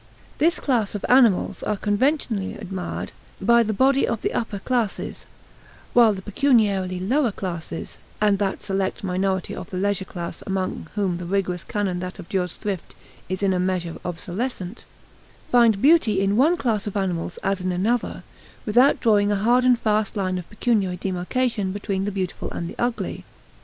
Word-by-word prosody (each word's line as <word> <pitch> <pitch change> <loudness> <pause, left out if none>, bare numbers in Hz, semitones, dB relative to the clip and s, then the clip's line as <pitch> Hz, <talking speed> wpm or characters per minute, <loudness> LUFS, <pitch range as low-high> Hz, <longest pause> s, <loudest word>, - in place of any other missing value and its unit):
This 335 +3 +3
class 230 -7 0
of 205 - -3
animals 245 -7 +4
are 210 - -1
conventionally 215 -1 0
admired 190 -3 -5 0.3
by 235 +4 +5
the 220 -1 0
body 265 +5 +3
of 230 - -2
the - - 0
upper 225 -3 -2
classes, 230 0 -2 0.7
while 235 -2 +7
the 190 -2 -5
pecuniarily 205 -6 +2
lower 245 +6 +1
classes 170 -4 -6 0.2
and 205 -2 +3
that 195 -2 -1
select 195 0 -2
minority 190 0 -1
of - - -8
the 185 - -5
leisure 200 0 0
class 170 -2 -6
among 190 -3 -2
whom 195 -4 0
the 175 - -6
rigorous 180 -2 -1
canon 195 -4 -2
that 185 +2 -6
abjures 180 -1 -2
thrift 200 -5 -5 0.3
is 185 +2 -2
in 195 -1 +3
a 180 - 0
measure 180 -2 -1
obsolescent 185 +4 -4 0.7
find 230 -4 +4
beauty 275 - +5
in 195 +1 +2
one 305 +9 +4
class 220 -7 -1
of 205 - -3
animals 180 -3 -2
as 195 -1 0
in 185 0 -1
another, 215 +7 -1 0.4
without 245 +6 +4
drawing 210 -3 +3
a - - +2
hard 240 +5 +3
and 250 -1 +5
fast 215 -2 0
line 185 -2 0
of 175 - -10
pecuniary 210 -5 0
demarcation 195 +3 -1
between 195 -1 -2
the 205 - -1
beautiful 190 -2 -3
and 170 - -3
the - - -8
ugly. 240 -1 -2
200 Hz, 170 wpm, -23 LUFS, 185-230 Hz, 0.7 s, while